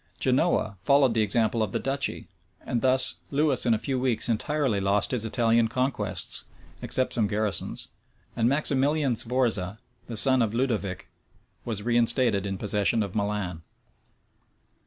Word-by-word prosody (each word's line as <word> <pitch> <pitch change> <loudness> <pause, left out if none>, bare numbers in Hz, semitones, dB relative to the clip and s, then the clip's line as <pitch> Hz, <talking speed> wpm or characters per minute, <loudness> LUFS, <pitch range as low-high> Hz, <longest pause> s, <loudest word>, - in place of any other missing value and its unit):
Genoa 100 - +1
followed 140 +1 +3
the 110 - +1
example 110 +2 +1
of 105 -3 -2
the - - 0
duchy; 140 +1 -1 0.4
and 120 - -2
thus 130 0 +3
Lewis 140 -3 +1
in 115 - +4
a - - -1
few 130 +3 -3
weeks 125 -3 -1
entirely 125 0 0
lost 100 +1 0
his 120 -4 0
Italian 115 0 +2
conquests, 130 +3 -1 0.4
except 130 0 +1
some 110 -3 +1
garrisons; 105 -1 -1 0.5
and 115 +1 +1
Maximilian 140 -1 +1
Sforza, 115 -5 -1 0.3
the 115 - -4
son 130 +2 +5
of 110 -1 -1
Ludovic, 110 -7 -2 0.6
was 110 -3 -4
reinstated 115 -3 +2
in 95 -1 -4
possession 105 +2 +1
of 100 -2 -7
Milan. 100 -5 -3
115 Hz, 140 wpm, -26 LUFS, 105-130 Hz, 0.6 s, son